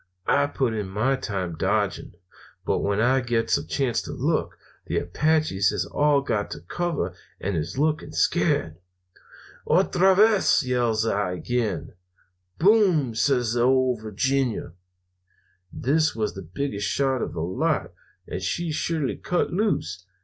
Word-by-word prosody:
"I 145 Hz, 0 st, +3 dB
put 130 Hz, -5 st, -1 dB
in 105 Hz, -3 st, -3 dB
my 110 Hz, +8 st, +1 dB
time 95 Hz, -9 st, -4 dB
dodging, -, -, -1 dB, 0.5 s
but -, -, +1 dB
when 100 Hz, 0 st, 0 dB
I 130 Hz, +4 st, +3 dB
gets 120 Hz, -2 st, +1 dB
a -, -, -6 dB
chance 135 Hz, -6 st, -1 dB
to -, -, -8 dB
look, -, -, -1 dB, 0.3 s
the -, -, -1 dB
Apaches 150 Hz, -, +1 dB
has 90 Hz, -, -1 dB
all 145 Hz, -, +2 dB
got 105 Hz, -6 st, -2 dB
to -, -, -6 dB
cover 165 Hz, -, -2 dB, 0.3 s
and 100 Hz, 0 st, -2 dB
is 80 Hz, +8 st, -3 dB
looking 155 Hz, +1 st, 0 dB
scared. 80 Hz, 0 st, +1 dB, 0.9 s
"'Otra 190 Hz, 0 st, +4 dB
vez!' 210 Hz, -5 st, +4 dB
yells 120 Hz, -3 st, +1 dB
I 100 Hz, -4 st, 0 dB
again. 110 Hz, -3 st, -2 dB, 0.6 s
"'Boom!' 180 Hz, -, +4 dB
says 120 Hz, -1 st, +1 dB
the 120 Hz, -, +1 dB
Ole 130 Hz, 0 st, +3 dB
Virginia. 115 Hz, -1 st, -1 dB, 1.0 s
"This 155 Hz, +3 st, +1 dB
was 110 Hz, -2 st, -1 dB
the 95 Hz, -, -7 dB
biggest 100 Hz, -, -3 dB
shot 135 Hz, -3 st, 0 dB
of -, -, -3 dB
the 85 Hz, -, -4 dB
lot, 90 Hz, +3 st, -1 dB, 0.3 s
and 90 Hz, -, -5 dB
she 165 Hz, -, -2 dB
surely 155 Hz, -2 st, -1 dB
cut 175 Hz, -1 st, -1 dB
loose. 95 Hz, -, -1 dB
125 Hz, 140 wpm, -25 LUFS, 100-150 Hz, 1.0 s, Otra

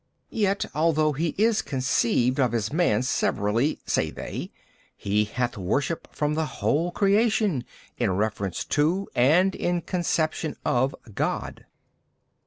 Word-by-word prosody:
B. -, -, -9 dB
Yet 200 Hz, -1 st, +1 dB
although 155 Hz, 0 st, +2 dB
he 160 Hz, +2 st, -2 dB
is 220 Hz, +1 st, +3 dB
conceived 130 Hz, -1 st, +1 dB
of 125 Hz, -3 st, +2 dB
as 110 Hz, +2 st, -2 dB
man 155 Hz, -10 st, +2 dB
severally 115 Hz, +1 st, 0 dB
(say -, -, 0 dB
|259 -, -, -16 dB
they), -, -, -6 dB, 0.5 s
he 105 Hz, +2 st, +1 dB
hath 120 Hz, +1 st, -3 dB
worship 135 Hz, -, -1 dB
from 150 Hz, 0 st, -1 dB
the 160 Hz, 0 st, -1 dB
whole 160 Hz, +3 st, 0 dB
creation, 205 Hz, -, +2 dB, 0.4 s
in 120 Hz, -4 st, +2 dB
reference 100 Hz, -3 st, -2 dB
to 170 Hz, +7 st, +1 dB
and 165 Hz, +10 st, +4 dB
in 175 Hz, -1 st, -1 dB
conception 160 Hz, -3 st, -1 dB
of 130 Hz, +3 st, +1 dB, 0.2 s
God. -, -, -3 dB
150 Hz, 135 wpm, -25 LUFS, 120-175 Hz, 0.5 s, and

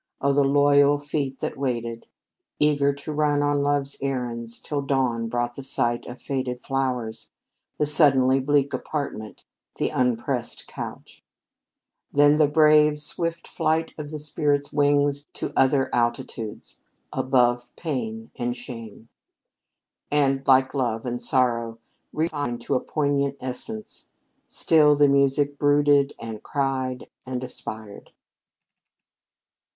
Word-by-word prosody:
Oh, 140 Hz, 0 st, +2 dB
the 140 Hz, 0 st, +4 dB
loyal 145 Hz, +1 st, +4 dB
feet 145 Hz, -2 st, -3 dB
that -, -, -3 dB
waited 120 Hz, -3 st, -3 dB, 0.5 s
eager 145 Hz, -1 st, +3 dB
to 140 Hz, +2 st, -7 dB
run 145 Hz, -1 st, +2 dB
on 145 Hz, 0 st, +1 dB
love's 140 Hz, -1 st, -1 dB
errands 120 Hz, -4 st, -3 dB
till 145 Hz, -2 st, -3 dB
dawn 130 Hz, -4 st, 0 dB
brought 120 Hz, +1 st, -2 dB
the 140 Hz, -, -8 dB
sight 120 Hz, -3 st, -1 dB
of 125 Hz, -, -8 dB
faded 130 Hz, -2 st, -3 dB
flowers, 125 Hz, -4 st, -2 dB, 0.5 s
the 150 Hz, -, +2 dB
suddenly 135 Hz, -3 st, +4 dB
bleak 140 Hz, +1 st, +1 dB
apartment, 140 Hz, -8 st, -5 dB, 0.3 s
the -, -, -1 dB
unpressed 125 Hz, 0 st, -1 dB
couch! -, -, -9 dB, 0.9 s
Then 145 Hz, +1 st, +5 dB
the 150 Hz, -, +5 dB
brave, 150 Hz, 0 st, +5 dB
swift 165 Hz, +3 st, -4 dB
flight 160 Hz, +1 st, 0 dB
of 150 Hz, -2 st, -7 dB
the 155 Hz, -, -5 dB
spirit's 145 Hz, -1 st, -1 dB
wings 145 Hz, 0 st, +2 dB
to -, -, -5 dB
other 135 Hz, 0 st, +3 dB
altitudes, 120 Hz, -2 st, -3 dB, 0.3 s
above 120 Hz, -2 st, +1 dB
pain 115 Hz, -8 st, -4 dB
and 120 Hz, +1 st, -2 dB
shame! 115 Hz, -3 st, -9 dB, 1.0 s
And 135 Hz, -2 st, +2 dB
like 130 Hz, 0 st, +4 dB
love 120 Hz, -4 st, -1 dB
and 120 Hz, 0 st, -3 dB
sorrow, 115 Hz, -3 st, 0 dB, 0.3 s
refined 145 Hz, -7 st, -2 dB
to 130 Hz, -, -2 dB
a 130 Hz, -, +3 dB
poignant 140 Hz, -1 st, -1 dB
essence, 125 Hz, -4 st, -7 dB, 0.4 s
still 150 Hz, -2 st, +4 dB
the 145 Hz, 0 st, +5 dB
music 140 Hz, +1 st, +2 dB
brooded 145 Hz, -1 st, +3 dB
and 110 Hz, -2 st, -7 dB
cried 130 Hz, -2 st, -2 dB, 0.2 s
and 130 Hz, 0 st, -4 dB
aspired. 110 Hz, -4 st, -8 dB
135 Hz, 125 wpm, -24 LUFS, 120-145 Hz, 1.0 s, Then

